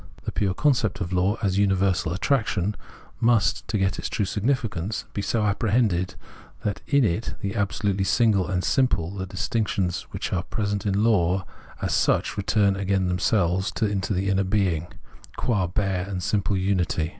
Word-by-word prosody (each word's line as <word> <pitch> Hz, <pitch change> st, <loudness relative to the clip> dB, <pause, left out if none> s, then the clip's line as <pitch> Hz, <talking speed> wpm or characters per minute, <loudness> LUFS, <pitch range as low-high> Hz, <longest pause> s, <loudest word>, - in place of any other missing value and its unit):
The -, -, -3 dB
pure 95 Hz, -3 st, 0 dB
concept 115 Hz, -9 st, +1 dB
of 90 Hz, -2 st, -3 dB
law, 95 Hz, +4 st, +2 dB
as 100 Hz, -1 st, +1 dB
universal 95 Hz, -3 st, +2 dB
attraction, 105 Hz, -1 st, 0 dB, 0.4 s
must, 115 Hz, -2 st, +2 dB
to 110 Hz, -, 0 dB
get 95 Hz, -1 st, 0 dB
its -, -, -3 dB
true 105 Hz, -, 0 dB
significance, 110 Hz, -2 st, -1 dB
be 100 Hz, -, -2 dB
so 110 Hz, +2 st, 0 dB
apprehended 105 Hz, -3 st, +1 dB, 0.5 s
that 105 Hz, -1 st, -2 dB
in 140 Hz, -1 st, +4 dB
it, 105 Hz, +3 st, -1 dB
as -, -, -3 dB
the 100 Hz, +2 st, -3 dB
absolutely 100 Hz, -1 st, 0 dB
single 100 Hz, -4 st, +3 dB
and 90 Hz, -1 st, -1 dB
simple, 125 Hz, -, +1 dB
the 95 Hz, -1 st, -4 dB
distinctions 95 Hz, -3 st, -1 dB
which -, -, -4 dB
are 90 Hz, -, +1 dB
present 100 Hz, +1 st, -2 dB
in 100 Hz, +1 st, +1 dB
law 95 Hz, -4 st, +2 dB, 0.4 s
as -, -, 0 dB
such, -, -, +2 dB
return 100 Hz, 0 st, +2 dB
again 95 Hz, -1 st, 0 dB
themselves 90 Hz, 0 st, +1 dB
into 100 Hz, -2 st, 0 dB
the 95 Hz, +2 st, -1 dB
inner 95 Hz, 0 st, +2 dB
being, 95 Hz, -4 st, 0 dB, 0.5 s
qua 100 Hz, -7 st, +1 dB
bare 95 Hz, 0 st, -1 dB
and 90 Hz, -2 st, -3 dB
simple 100 Hz, -1 st, 0 dB
unity. 90 Hz, -4 st, 0 dB
100 Hz, 165 wpm, -25 LUFS, 95-105 Hz, 0.5 s, in